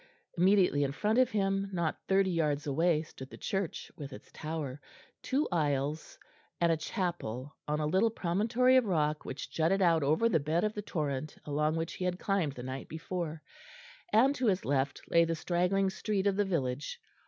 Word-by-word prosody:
Immediately 180 -5 +4
in 140 -1 -1
front 215 - +1
of 255 -1 +4
him, 195 -1 0
not 170 -4 -1
thirty 195 -1 +3
yards 150 -4 0
away, 155 +2 +2
stood 130 -4 -11
the - - -11
church, 195 -4 -3
with 140 -1 -7
its - - -12
tower, 150 -3 -5 0.4
two 280 +4 0
aisles, 150 -2 -1 0.4
and 170 -1 +3
a - - +4
chapel 160 - -3
on 150 0 0
a 155 - 0
little 190 +9 +3
promontory 225 +7 +2
of 255 - +4
rock 155 -5 0
which - - -6
jutted 165 +5 +2
out 170 -4 +4
over 155 +11 +3
the 180 -8 +3
bed 155 +4 0
of 215 0 0
the 210 - -4
torrent 150 -6 -3
along 150 +2 0
which 165 0 -2
he 185 - -4
had 180 0 0
climbed 190 -8 0
the 125 - -8
night 130 +1 -6
before; 165 -1 -4 0.7
and 260 +6 +5
to 255 -4 -1
his 190 -2 +1
left 135 0 0
lay 170 - +6
the 165 0 0
straggling 180 +3 +1
street 200 0 -1
of 200 -1 +3
the 205 0 +2
village. 140 -7 -2
170 Hz, 190 wpm, -31 LUFS, 150-195 Hz, 0.7 s, lay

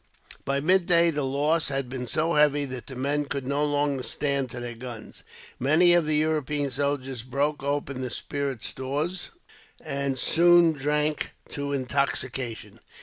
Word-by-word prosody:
By 140 0 0
midday, 170 0 +4
the 150 -1 -2
loss 145 +4 +1
had 135 -2 -2
been 125 -1 -5
so 160 +6 +1
heavy 145 -1 +3
that 130 -2 -7
the 130 - -8
men 145 +3 -1
would 140 -2 -3
no 140 +2 0
longer 145 -2 0
stand 140 +2 -1
to 120 - -7
their 120 0 -5
guns. 115 -2 -9 0.4
Many 160 +7 +5
of 170 -3 +3
the 155 - +1
European 150 -2 0
soldiers 135 -3 -2
broke 140 +4 -1
open 140 -1 -2
the 130 - -3
spirit 135 -2 -4
stores, 150 +8 -3 0.5
and 140 -1 -2
soon 175 +3 +5
drank 150 +1 -1
to 140 0 -4
intoxication. 130 -3 -2
140 Hz, 150 wpm, -26 LUFS, 130-150 Hz, 0.5 s, Many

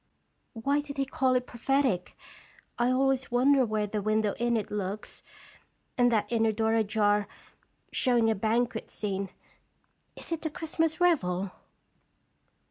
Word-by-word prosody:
Why 275 +5 0
did 290 -1 -6
he 275 - +1
call 260 -1 +1
it 250 0 +1
prophetic? 250 -6 0 0.6
I 240 +1 +3
always 265 0 +1
wonder 260 +3 +4
where 215 -2 0
the 210 0 -3
window 215 0 +1
in 240 0 +2
it 215 - -4
looks, 205 0 -4 0.7
and 245 -1 +3
that 220 0 0
inner 225 -1 +2
door 220 +1 0
ajar, 210 -2 +2 0.6
showing 240 -3 +2
a 225 - +3
banquet 225 +2 -1
scene. 195 -2 -3 0.9
Is - - -8
it 330 -1 -2
a 315 - -1
Christmas 320 +1 -1
revel?" 195 - +1
230 Hz, 135 wpm, -28 LUFS, 210-270 Hz, 0.9 s, wonder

